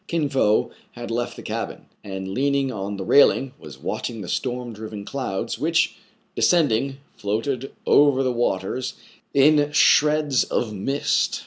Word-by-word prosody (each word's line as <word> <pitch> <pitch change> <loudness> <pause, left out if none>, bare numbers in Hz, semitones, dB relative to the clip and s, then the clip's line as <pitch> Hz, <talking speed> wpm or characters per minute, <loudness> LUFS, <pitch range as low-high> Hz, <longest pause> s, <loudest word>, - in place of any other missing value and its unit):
Kin 160 -4 -1
Fo 110 -6 +2 0.2
had 120 -1 -7
left 120 +1 -2
the - - -10
cabin, - - -5 0.2
and, 95 -1 -6
leaning 140 +2 +1
on 100 -2 -4
the 95 - -4
railing, 135 +3 +4
was 75 -3 -11
watching 115 -3 -4
the 95 - -7
storm 125 +4 -3
driven 105 -1 -8
clouds, 115 -7 -4
which, - - +2 0.4
descending, 135 -5 +2 0.2
floated 120 +6 -2
over 140 -2 +4
the 130 -1 0
waters 120 +1 -2 0.4
in 145 +1 +4
shreds 150 -2 +4
of 110 -3 -2
mist. 135 +9 0
125 Hz, 140 wpm, -23 LUFS, 105-140 Hz, 0.4 s, railing